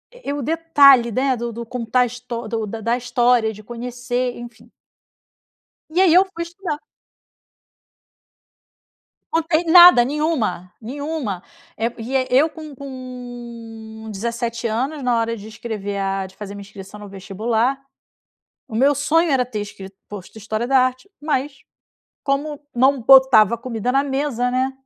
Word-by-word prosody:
E - - -14
e - - 0
o 290 - -3
detalhe 280 -5 +5
né, 260 +3 +1
do 235 0 -4
do 235 +1 -6
contar 245 +1 0
a - - +4
histó 240 -1 -7
do 225 0 -2
do 220 +2 -6
da 230 +3 0
história, 240 -2 +2
de 215 - -12
conhecer, 245 +2 -4
enfim. 235 -1 -12 1.2
E 355 +4 +2
aí 365 -4 +5
eu 365 +2 +7
fui 335 - -3
estudar. 340 -3 -5 2.5
Não 325 0 +2
tem 325 +1 +1
nada, 345 -5 +9
nenhuma 250 - -2
nenhuma, 265 - -4 0.3
eh, 225 - 0
e 250 +4 -4 0.2
eu 280 +6 +4
com 310 -2 -10
com 240 -4 -9
17 235 +3 -4
anos, 265 +6 -2
na 245 -1 +2
hora 230 0 -2
de 205 0 -10
escrever 215 -2 -5
a, 195 0 -2
de 190 0 -14
fazer 205 -1 -8
minha 200 - -8
inscrição 200 0 -11
no 205 - -9
vestibular, 220 +7 -1 0.9
o - - -9
meu 275 +5 +4
sonho 320 +4 +2
era 260 -2 +2
ter 235 -4 -5
escrito 195 -1 -9
posto 205 +1 -10
história 220 +2 -3
da 265 +1 +4
arte, 255 +9 0
mas, 290 -2 -2 0.7
como 285 +1 -2 0.2
não 265 +2 +3
botava 255 -4 +6
comida 235 0 -3
na 275 +2 +2
mesa, 270 -3 -1
né, 255 +1 0
245 Hz, 150 wpm, -21 LUFS, 220-275 Hz, 2.5 s, nada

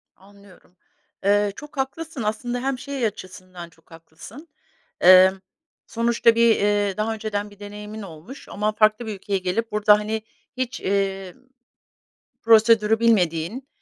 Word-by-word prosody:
Anlıyorum. 200 -2 -21 0.5
Eee, 205 0 +2
çok 295 -2 -12
haklısın 275 0 -4
aslında 240 +4 -3
hem, 265 -1 -2
şey, 275 -3 -4
açısından 185 -3 -8
çok 165 0 -28
haklısın. 165 - -14 0.6
Eee, 185 +1 +8 0.6
sonuçta 230 0 +2
bir, 230 -1 +4
eee, 205 -1 0
daha 215 +1 -1
önceden 210 -1 -4
bir 205 0 -19
deneyimin 210 +1 -9
olmuş 190 - -12
ama 210 +1 -2
farklı 215 +2 +2
bir 215 - -4
ülkeye 195 +1 -3
gelip, 185 +5 -3
burada, 210 0 +4
hani, 215 +1 -3 0.4
hiç, 255 -1 -4
emm. 195 -1 -2 1.0
Prosedürü 225 -1 +4
bilmediğin, 210 +2 0
210 Hz, 130 wpm, -22 LUFS, 195-230 Hz, 1.0 s, Eee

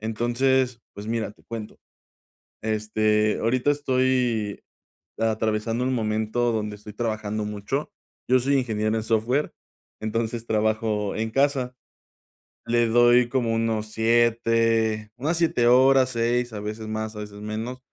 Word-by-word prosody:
Entonces, 120 +3 +1
pues, 100 +1 -9
mira, 115 -1 -2
te - - -26
cuento. 115 -2 -7 0.8
Este, 110 0 +1
ahorita 125 +5 +1
estoy 130 -6 0 0.6
atravesando 110 +1 0
un 130 0 0
momento 110 +1 0
donde 105 -2 -3
estoy 105 +1 -11
trabajando 110 -2 -2
mucho. 105 +8 -3 0.4
Yo 130 +1 +5
soy 140 +3 +1
ingeniero 110 -3 0
en 110 - -1
software. 115 +6 0 0.5
Entonces 115 +1 -2
trabajo 110 -1 0
en 110 +1 -2
casa. 135 -1 +1 0.9
Le 120 0 +2
doy 120 +1 +5
como 120 -3 0
unos 115 -1 -1
7 115 -1 +2
unas 155 +7 -1
7 160 -8 +2
horas, 130 +1 +5
6 120 +1 0
a 105 - -4
veces 110 +1 -5
más, 110 0 -4
a - - -6
veces 105 -1 -8
menos. 110 +4 -5
115 Hz, 130 wpm, -24 LUFS, 110-125 Hz, 0.9 s, Yo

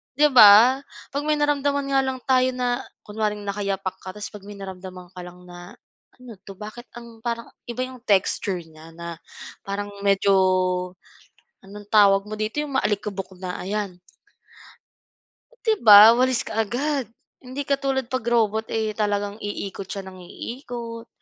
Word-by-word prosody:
'di 295 +2 +4
ba? 235 +2 +8 0.3
'Pag 285 +1 -2
may 305 - +3
naramdaman 285 -1 +1
nga 270 - +4
lang 265 -1 -2
tayo 255 -1 +3
na 245 -1 -1 0.2
kunwaring 210 -1 -3
nakayapak 200 -1 -3
ka 185 - -9
tapos 210 -1 -7
'pag 205 -2 -12
may 205 - -9
naramdaman 185 -2 -9
ka 180 - -11
lang 180 0 -11
na, 175 +1 -12 0.4
"Ano 245 -5 -13
'to 195 +1 -12
bakit 215 +4 -10
ang 235 -1 -11
parang 235 0 -4 0.2
iba 245 +2 -3
'yong 255 -1 -10
texture 190 -2 +1
niya," 160 0 -15
na 170 -1 -8 0.4
parang 205 +1 -5
medyo 200 0 +2 1.3
anong 205 +1 -12
tawag 200 -2 +5
mo 215 - -5
dito, 215 +7 -2
'yong 280 -3 -2
maalikabok 200 -3 -2
na 180 -1 -4
ayan. 200 -2 -3 1.6
'Di 445 - +2
ba? 210 +2 +10
Walis 255 -1 +2
kaagad. 250 +6 -1 0.4
Hindi 260 +2 -6
katulad 270 -2 0
'pag 255 -2 -3
robot 220 -1 +1
eh, 220 -1 -1
talagang 205 -1 -1
iikot 200 -1 -5
siya 200 - -4
ng 185 0 -11
iikot, 235 +2 -8
215 Hz, 150 wpm, -23 LUFS, 195-250 Hz, 1.6 s, ba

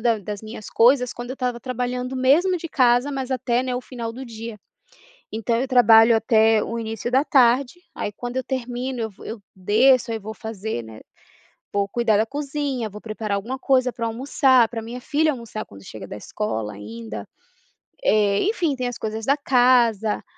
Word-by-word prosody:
da 230 -1 +2
das 205 0 -6
minhas 215 -1 -9
coisas 250 +1 +4
quando 240 +1 -7
eu - - -3
estava 250 -2 -3
trabalhando, 250 +1 -3
mesmo 310 +9 +3
de 335 - -6
casa, 250 -1 +3
mas 265 -1 -4
até, 250 -1 0
né, 255 -1 -2
o - - -3
final 235 -3 -6
do 255 +3 -8
dia. 230 -2 -8 0.8
Então, 225 +1 0
eu 260 - 0
trabalho 230 -2 +6
até 220 -1 +3
o 230 - -4
início 225 +1 -4
da 265 +3 +3
tarde, 260 +4 +3
aí 205 - -4
quando 245 +4 -6
eu 260 - -1
termino, 250 0 -3
eu 220 - -3
vou 195 - -15
eu 225 -1 -6 0.2
desço, 230 +6 +3
aí 225 - -2
vou 220 +1 -8
fazer, 220 - -5
né, 110 -1 -11 0.7
vou 200 -1 +1
cuidar 230 -2 +2
da 220 - +2
cozinha, 280 -3 -3
vou 210 +1 -10
preparar 215 -2 -3
alguma 230 +7 -4
coisa 255 -2 +2
para 230 - -3
eu - - 0
almoçar, 255 0 +3
para 230 -2 -5
minha 235 +3 -7
filha 305 +3 +1
almoçar 230 -4 -6
quando 100 0 -14
chega 110 - -9
da - - -7
escola 110 - -4
ainda. 105 0 -8 0.8
Eh, 205 -1 +3
enfim, 355 -8 0
tem 250 -1 -2
as 245 - -5
coisas 220 0 -4
da 280 - +4
casa. 245 -6 +3
235 Hz, 190 wpm, -23 LUFS, 220-255 Hz, 0.8 s, trabalho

